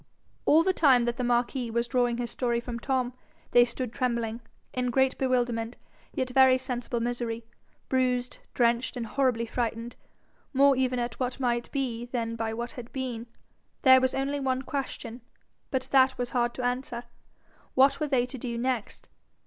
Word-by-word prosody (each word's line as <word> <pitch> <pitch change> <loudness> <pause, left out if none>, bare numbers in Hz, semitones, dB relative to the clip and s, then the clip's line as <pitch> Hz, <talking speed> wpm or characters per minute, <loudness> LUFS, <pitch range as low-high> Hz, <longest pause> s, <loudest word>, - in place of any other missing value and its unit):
All 315 +2 +6
the 375 +1 +2
time 265 -8 +5
that 240 0 -1
the 250 - -1
marquis 245 +1 0
was 235 +1 0
drawing 245 -2 +1
his 240 -1 -3
story 240 -2 0
from 235 0 -5
Tom, 255 -1 -1 0.4
they 240 - +7
stood 240 0 -5
trembling, 235 -3 -1 0.3
in 250 -1 0
great 265 +2 +2
bewilderment 245 -3 0 0.3
yet 255 -1 -2
very 260 0 +6
sensible 250 -2 -3
misery, 235 -1 -3 0.4
bruised, 250 -1 0 0.2
drenched, 240 +1 +2
and 235 - -3
horribly 245 -1 +1
frightened, 230 0 -3 0.6
more 275 +1 +6
even 255 -1 +1
at 240 -1 -3
what 255 +1 -2
might 240 -2 -1
be 245 -4 -2
than 235 -2 -3
by 225 -1 -2
what 235 +2 -4
had 245 -2 -9
been. 245 -3 -4 0.6
There 260 -2 +8
was 260 0 +1
only 275 +2 -1
one 260 -1 -1
question, 260 -4 -5 0.5
but 260 -2 -1
that 265 -1 +5
was 245 0 -3
hard 240 -1 0
to 255 - -4
answer: 245 -1 -2 0.7
what 270 +4 +5
were 305 - 0
they 260 -4 +2
to 255 +1 -8
do 235 -1 -4
next? 245 -2 -2
245 Hz, 170 wpm, -28 LUFS, 235-260 Hz, 0.7 s, There